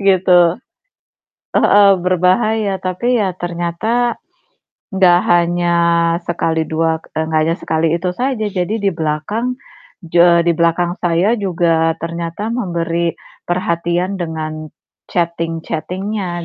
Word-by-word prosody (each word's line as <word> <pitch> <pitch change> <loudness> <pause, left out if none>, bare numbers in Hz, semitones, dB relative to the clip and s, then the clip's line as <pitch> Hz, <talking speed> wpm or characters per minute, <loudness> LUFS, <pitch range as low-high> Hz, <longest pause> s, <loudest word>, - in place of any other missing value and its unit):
Gitu. 190 -2 +3 1.2
Heeh. 200 -1 +5
Berbahaya, 190 +3 +1
tapi 210 +7 -1
ya 190 -4 -1
ternyata 175 +8 -1 0.8
gak 180 -2 +4
hanya 175 0 +2 0.5
sekali 160 -2 -1
dua 160 0 0
k - - -21
eee, 160 - 0
gak 155 - +3
hanya 165 +2 0
sekali 160 +1 -1
itu 180 +1 -2
saja. 250 +2 -2
Jadi 185 +2 -2
di 200 -3 0
belakang 165 +11 -2 0.5
ju 170 +1 +1
eee, 170 -1 +6
di 170 - +3
belakang 170 +1 +1
saya 175 +4 +2
juga 165 -4 +1
ternyata 170 +6 -4
memberi 170 -6 -1 0.4
perhatian 175 +1 -1
dengan 155 -1 -5 0.4
chatting-chatting-nya 175 +2 -3
175 Hz, 115 wpm, -17 LUFS, 165-195 Hz, 1.2 s, eee